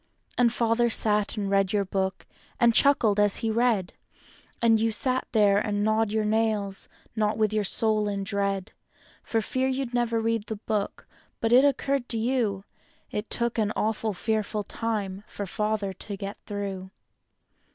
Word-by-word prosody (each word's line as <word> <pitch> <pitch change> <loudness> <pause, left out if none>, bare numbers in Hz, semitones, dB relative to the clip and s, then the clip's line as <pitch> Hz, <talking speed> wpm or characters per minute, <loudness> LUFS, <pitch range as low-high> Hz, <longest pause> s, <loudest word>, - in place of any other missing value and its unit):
And 240 -1 +3
Father 235 0 +2
sat 210 -1 +1
and 205 -1 -1
read 195 0 +2
your 200 -1 +1
book, 190 0 -2 0.3
and 235 -1 +5
chuckled 225 -7 +4
as 205 -1 +4
he 225 -2 -1
read. 225 -5 +1 0.7
And 225 -1 +4
you 225 +1 +1
sat 255 +4 0
there 205 -2 +4
and 205 -1 -1
gnawed 220 0 +2
your 215 0 0
nails, 210 -2 0 0.3
not 215 -1 0
with 215 -1 +1
your 215 -1 +1
soul 215 +1 +1
in 200 -1 -2
dread 200 0 -2 0.5
For 225 - -1
fear 260 +4 -1
you'd 260 -2 -2
never 235 -2 +1
read 225 -1 -1
the 220 - -3
book, 205 -1 -3 0.3
but 225 - 0
it 250 +2 +7
occurred 275 -2 0
to 230 - -1
you 225 -4 0 0.5
It 210 +1 -4
took 235 -1 0
an 215 -1 +1
awful, 215 -1 -1
fearful 215 +1 -1
time 205 -3 -3
for 205 - -5
Father 210 0 -1
to 200 +1 -7
get 200 +1 -6
through. 195 -2 -4
215 Hz, 165 wpm, -26 LUFS, 200-230 Hz, 0.7 s, it